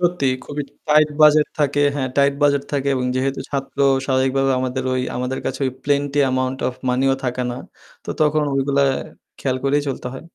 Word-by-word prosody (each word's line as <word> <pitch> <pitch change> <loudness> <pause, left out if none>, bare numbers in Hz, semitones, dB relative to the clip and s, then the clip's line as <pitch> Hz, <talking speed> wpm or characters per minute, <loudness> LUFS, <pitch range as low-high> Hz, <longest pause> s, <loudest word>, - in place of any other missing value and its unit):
সত্যি 175 -5 +1 0.2
খুবই 145 0 -4 0.2
tight 155 0 +5
budget 150 0 +6
থাকে, 145 -1 +1
হ্যাঁ 135 -2 -1
টাইট 140 0 +4
বাজেট 140 -1 +3
থাকে 140 -1 0
এবং 125 -1 -1
যেহেতু 135 +1 -1
ছাত্র 140 0 -4 0.3
স্বাভাবিকভাবে 135 0 +2
আমাদের 130 0 -2
ওই 130 - 0 0.2
আমাদের 125 +1 -2
কাছে 130 0 -3
ওই - - -1
প্লেনটি 145 0 0
অ্যামাউন্ট 130 0 -1
অফ 125 - -6
মানিও 135 +2 +2
থাকে 125 0 -1
না। 120 - -5 0.5
তো - - -5
তখন 155 0 +3
ওইগুলো 135 +1 +1 0.6
খেয়াল 130 -2 -1
করেই 145 +1 +2
চলতে 130 -2 -4
হয়। 130 - -9
135 Hz, 180 wpm, -20 LUFS, 130-145 Hz, 0.6 s, বাজেট